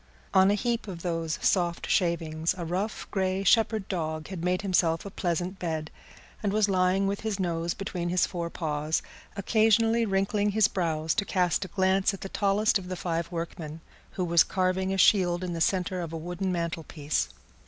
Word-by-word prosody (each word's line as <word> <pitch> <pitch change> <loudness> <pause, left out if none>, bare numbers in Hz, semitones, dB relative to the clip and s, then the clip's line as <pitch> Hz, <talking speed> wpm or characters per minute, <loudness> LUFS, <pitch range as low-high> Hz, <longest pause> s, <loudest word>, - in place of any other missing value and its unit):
On 190 +1 +6
a 205 - +3
heap 235 +1 -1
of 175 -4 -7
those 165 -2 -2
soft 175 -3 +1
shavings 165 -2 0
a 175 - -4
rough, 190 +6 -3
grey 190 -1 0
shepherd 220 0 +3
dog 155 -3 -3
had 185 -4 -6
made 180 +2 0
himself 175 -3 +1
a 200 - -6
pleasant 180 +1 -2
bed, 160 -3 -3 0.5
and 205 - 0
was 210 0 +3
lying 185 0 +2
with 200 +1 -1
his 215 -3 -2
nose 170 -2 -1
between 180 -3 -3
his 180 +1 +3
fore 170 -2 -4
paws, 155 -1 -2 0.3
occasionally 225 +2 +3
wrinkling 200 +1 +1
his 215 -1 +5
brows 160 -3 -1
to - - 0
cast 185 -1 +1
a - - -7
glance 190 +2 +2
at - - -14
the 195 - -5
tallest 205 +2 +2
of 180 - -9
the 185 - -3
five 170 -1 -3
workmen, 165 -2 -5 0.3
who 185 - -1
was 170 -1 +5
carving 185 0 0
a 195 - -1
shield 185 -2 +4
in 180 -1 -3
the 165 - -4
centre 185 0 +1
of 165 -2 -5
a 165 - -4
wooden 175 +3 -3
mantelpiece. 165 -3 -2
185 Hz, 185 wpm, -28 LUFS, 170-195 Hz, 0.5 s, On